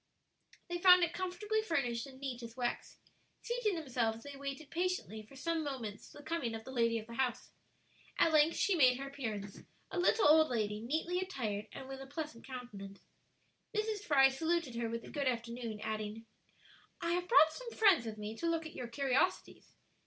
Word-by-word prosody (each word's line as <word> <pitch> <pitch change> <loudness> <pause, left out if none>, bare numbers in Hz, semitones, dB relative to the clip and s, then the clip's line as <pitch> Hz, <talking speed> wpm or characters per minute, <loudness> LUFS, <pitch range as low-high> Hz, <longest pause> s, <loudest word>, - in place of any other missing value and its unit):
They 350 0 -3
found 360 0 +8
it 340 0 +1
comfortably 390 +4 -1
furnished 275 - -1
and 260 -1 -13
neat 260 -3 -4
as 230 +1 -9
wax. 245 -1 -3 0.5
Seating 475 -4 0
themselves 240 -7 -1
they 285 0 -8
waited 275 +2 -6
patiently 350 - -2
for 215 +6 -16
some 330 +4 -1
moments 245 -8 -5
the 290 - -12
coming 285 -9 -2
of 220 - -7
the 260 - -9
lady 230 -2 +2
of 220 - -5
the 235 - -10
house. 255 0 -1 0.7
At 325 - +4
length 310 +2 +5
she 400 - +2
made 255 -7 +5
her 275 +1 -5
appearance; 220 -8 -5 0.3
a 360 - -2
little 365 +1 +4
old 315 +1 +7
lady, 210 -3 -1
neatly 320 +9 -1
attired, 225 - -3
and 265 - -8
with 270 0 -7
a 270 - -8
pleasant 285 -4 -6
countenance. 210 -7 -8 0.8
Mrs. 430 0 0
Fry 275 -8 +5
saluted 320 0 -1
her 235 -1 -2
with 230 0 -4
a - - -10
good 280 -3 -1
afternoon, 235 -2 -3
adding, 215 +1 -4 0.7
"I 340 -2 -1
have 355 +1 0
brought 315 -8 +6
some - - -7
friends 395 - +4
with 215 -1 -5
me 210 +1 -5
to 335 - -1
look 330 -1 0
at 315 - -8
your 245 - -5
curiosities. 260 +2 0
270 Hz, 190 wpm, -34 LUFS, 230-335 Hz, 0.8 s, found